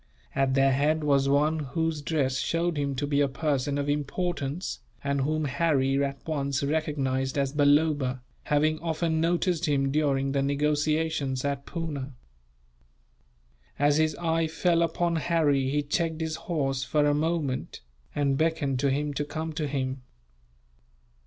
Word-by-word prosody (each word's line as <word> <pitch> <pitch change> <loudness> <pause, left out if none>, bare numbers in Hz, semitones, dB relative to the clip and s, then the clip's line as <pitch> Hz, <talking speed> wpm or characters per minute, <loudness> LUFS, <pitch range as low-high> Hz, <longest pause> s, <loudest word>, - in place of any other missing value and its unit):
At 135 -1 +1
their 135 0 +4
head 150 +4 +1
was 140 -2 +3
one 150 +3 +2
whose 155 +2 -2
dress 140 -4 0
showed 165 +4 0
him 140 -2 -1
to 140 +3 -1
be 145 0 +1
a 140 - +3
person 140 0 -1
of 140 0 -2
importance; 150 +2 -2 0.2
and 140 -1 0
whom 155 +2 0
Harry 140 -2 +1
at 140 -1 -4
once 140 -3 -1
recognized 140 -3 -1
as 140 -1 0
Balloba, 145 -3 +2 0.2
having 155 +1 +2
often 160 0 -1
noticed 175 0 +1
him 135 -2 +1
during 135 -2 +1
the 140 0 +1
negotiations 145 -1 0
at 140 -1 -2
Poona. 145 -5 -4 1.6
As 145 +1 +3
his 155 0 +2
eye 165 -1 0
fell 170 +1 +1
upon 170 0 +1
Harry 150 -5 +2
he 145 +1 0
checked 160 +2 -1
his 160 -1 -2
horse 135 -5 0
for 145 +3 +1
a 145 - +3
moment, 150 -3 -1 0.3
and 140 -2 +1
beckoned 155 -5 0
to 140 - +2
him 145 +2 -1
to 145 - -1
come 160 +2 -4
to 155 -1 -2
him. 130 -1 -2
145 Hz, 150 wpm, -27 LUFS, 140-160 Hz, 1.6 s, their